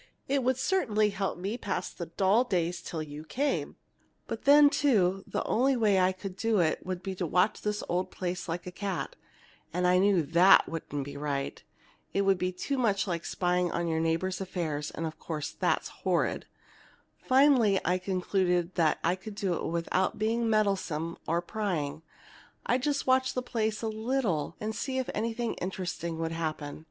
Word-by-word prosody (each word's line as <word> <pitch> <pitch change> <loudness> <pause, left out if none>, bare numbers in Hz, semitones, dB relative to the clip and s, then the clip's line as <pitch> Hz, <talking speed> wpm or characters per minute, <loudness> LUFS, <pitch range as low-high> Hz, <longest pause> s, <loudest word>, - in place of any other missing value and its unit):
It 275 0 +1
would 255 0 +2
certainly 220 - +1
help 195 -2 -2
me 190 +3 -3
to - - -29
pass - - -2
the 170 - -7
dull 195 +7 +3
days 180 -7 -1
till 160 -2 -4
you 150 0 -8
came! 275 - -1 0.5
"But 225 - -6
then, 290 +1 +8
too, 195 -11 +2
the - - -2
only 265 +4 +2
way 215 -4 +3 0.3
to 200 - -3
do 210 +3 0
it 160 -3 +1
would 185 -1 -4
be 195 - -3
to 180 -2 -3
watch 180 +6 +2
this 210 0 -2
old 180 +1 -1
place 180 -1 -4
like 170 +2 -3
a 180 - -6
cat, 195 0 -4 0.6
and 180 +2 0
I 180 0 +5
knew 195 -3 +4
that 170 +6 +6
wouldn't 150 -3 -4
be 140 +1 -8
right. 140 -1 -3 0.5
It 200 - +2
would 195 -2 +3
be 180 0 0
too 260 +9 -3
much 205 -5 +2
like 170 -4 -2
spying 180 0 0
into 170 0 -1
your 160 - 0
neighbor's 165 +3 0
affairs, 160 -6 -3
and, 165 - -5
of 160 -1 -6
course, 155 -3 -4
that's - - 0
horrid. - - 0 0.7
Finally, 255 -7 +4
I 180 +1 +2
concluded, 185 -1 0
that 160 -4 +3
if - - -7
I 170 - +3
could 200 +3 -9
do 195 -3 -1
it - - -3
without 170 +3 0
being 225 +2 0
meddlesome 190 -7 0
or 170 +2 +1
prying, 175 -8 -2 0.6
I'd 250 +1 +1
just 285 +1 0
watch 260 0 +2
the 255 - -1
place 220 -3 -2
a - - 0
little 220 - -1
and 215 +1 -3
see 260 +1 -3
if 260 - -1
anything 230 +1 -1
interesting 180 -3 -3
would 165 0 -2
happen. 155 -3 -4
185 Hz, 185 wpm, -29 LUFS, 170-220 Hz, 0.7 s, then